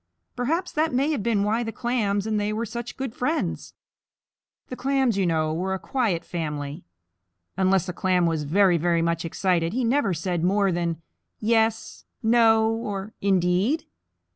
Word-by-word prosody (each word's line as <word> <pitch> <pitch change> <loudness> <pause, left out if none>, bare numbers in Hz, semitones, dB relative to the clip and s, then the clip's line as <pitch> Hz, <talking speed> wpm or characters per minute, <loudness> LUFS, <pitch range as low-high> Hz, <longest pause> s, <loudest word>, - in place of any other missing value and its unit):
Perhaps 320 +9 -1
that 310 +1 +1
may 275 +4 +2
have 290 - -1
been 205 -2 +1
why 220 +3 +1
the 225 -1 -3
Clams 220 -5 -1
and 215 -1 0
they 205 0 -1
were 220 +2 -2
such 235 +2 -6
good 265 -4 -4
friends. 300 +7 -2 0.9
The 255 - -5
Clams, 265 -3 +1
you 195 -2 +1
know, 155 -2 +1
were 190 +4 -1
a - - -3
quiet 195 -8 -1
family. 150 -4 -4 0.7
Unless 190 0 +2
a 180 - -3
Clam 180 -1 +1
was 165 -2 0
very, 175 +4 +3
very 170 0 +1
much 170 0 -1
excited, 170 0 0
he 255 +2 0
never 235 -5 +1
said 170 +1 -2
more 195 +1 +2
than 170 -2 -2 0.4
"Yes," 225 0 0 0.2
"No," 225 -1 +4
or 210 -2 -4
"Indeed?" 195 - +1
200 Hz, 165 wpm, -25 LUFS, 175-235 Hz, 0.9 s, No